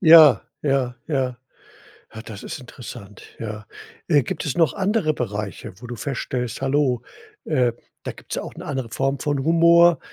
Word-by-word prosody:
Ja, 160 - +9 0.2
ja, 135 -4 +1
ja. 130 -5 0 0.8
Ja, 110 - -7
das 105 -3 -9
ist - - -5
interessant, 115 -5 -10 0.2
ja. 110 -1 -6 0.4
Äh, 145 -6 +4
gibt - - -4
es 145 - -2
noch 165 -5 +4
andere 195 -5 +1
Bereiche, 105 -8 -4
wo 125 - -10
du 120 - -5
feststellst: 125 -1 -3
„Hallo, 135 -3 +1 0.4
äh, 125 -6 +2 0.3
da - - -3
gibt's - - -8
ja - - -2
auch - - -8
'ne - - -8
andere 130 -4 -3
Form 135 +3 -1
von 145 -3 -1
Humor.“ 170 0 +6
135 Hz, 165 wpm, -23 LUFS, 120-155 Hz, 0.8 s, Ja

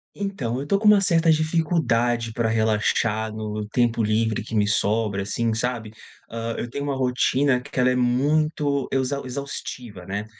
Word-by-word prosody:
Então, 195 - -3
eu 135 - -3
estou 195 +7 +1
com 215 - +1
uma 210 -1 +7
certa 170 -3 +3
dificuldade 140 -8 +1
pra 115 -1 0
relaxar 110 0 +1
no 105 -1 -5
tempo 120 0 +1
livre 110 +1 0
que 110 0 -6
me 105 -1 +3
sobra 105 -1 0
assim, 115 +3 -1
sabe? 115 -1 -3 0.4
Hã, 115 0 -4
eu - - -3
tenho 140 +3 -4
uma 140 -1 -1
rotina 130 +1 +2
q 145 - -13
que - - -3
ela 125 0 +4
é 125 - +1
muito 140 +3 +1
exau 135 +1 -1
exaustiva, 125 -6 -6
né. 100 +2 -3
120 Hz, 175 wpm, -23 LUFS, 110-140 Hz, 0.4 s, uma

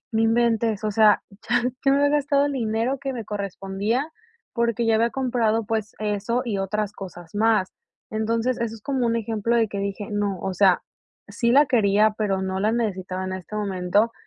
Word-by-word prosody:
no 220 - +1
inventes. 225 -2 +2
O 210 - +1
sea, 215 0 +5 0.3
ya - - +3 0.2
yo 270 - +5
me 280 - +3
había 285 +1 +3
gastado 285 0 +2
el 285 - -2
dinero 230 +2 -1
que 275 -1 -4
me 230 -3 -5
correspondía, 200 - -2 0.5
porque 235 -1 0
ya 225 - +3
había 230 +1 +2
comprado, 235 -4 0
pues, 220 0 -3
eso 210 +3 -1
y 215 -5 -2
otras 205 +1 -2
cosas 175 -3 -10
más. 215 -3 +2 0.4
Entonces, 230 +3 0
eso 225 -1 -2
es 215 - -17
como 265 -2 0
un 230 0 +1
ejemplo 225 +1 -1
de 225 -2 +2
que 200 - -5
dije: 200 +1 -4
"No, 205 -2 -1
o 190 - -2
sea, 185 -1 +4 0.5
sí 235 -1 0
la 290 +2 +6
quería, 215 -2 +3
pero 195 -3 0
no 190 0 -2
la 215 - +2
necesitaba 190 -5 -2
en 185 - -4
este 190 +3 -7
momento. 200 +2 +1
220 Hz, 195 wpm, -24 LUFS, 200-235 Hz, 0.5 s, la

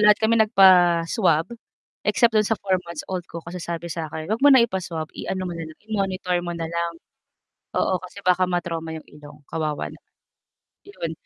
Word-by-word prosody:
lahat 210 0 +7
kami 220 +1 +2
nagpa-swab 180 -2 +4 0.5
except 235 -2 +3
dun 215 -1 +3
sa 225 - +1
four-months-old 180 -2 -3
ko 170 -1 -8
kasi 175 +1 -7
sabi 170 -1 -4
sa'kin, 160 -1 -5
huwag 225 - -1
mo 285 - +7
na 260 -4 +7
ipa-swab, 170 -6 -4
i-ano 185 -1 -4
mo 175 - -4
na 165 -1 -6
lang, 155 - -13
i-monitor 190 -4 -1
mo 175 -1 -5
na 165 - -3
lang. 170 +1 -2 0.8
Oo, 185 -2 +1
kasi 185 +2 -10
baka 185 0 +4
ma-trauma 165 -2 -3
yung 160 - -10
ilong, 150 0 -14
kawawa 155 -2 -2
naman. - - -18 0.8
'Yon, 165 - -5
175 Hz, 170 wpm, -23 LUFS, 165-195 Hz, 0.8 s, lahat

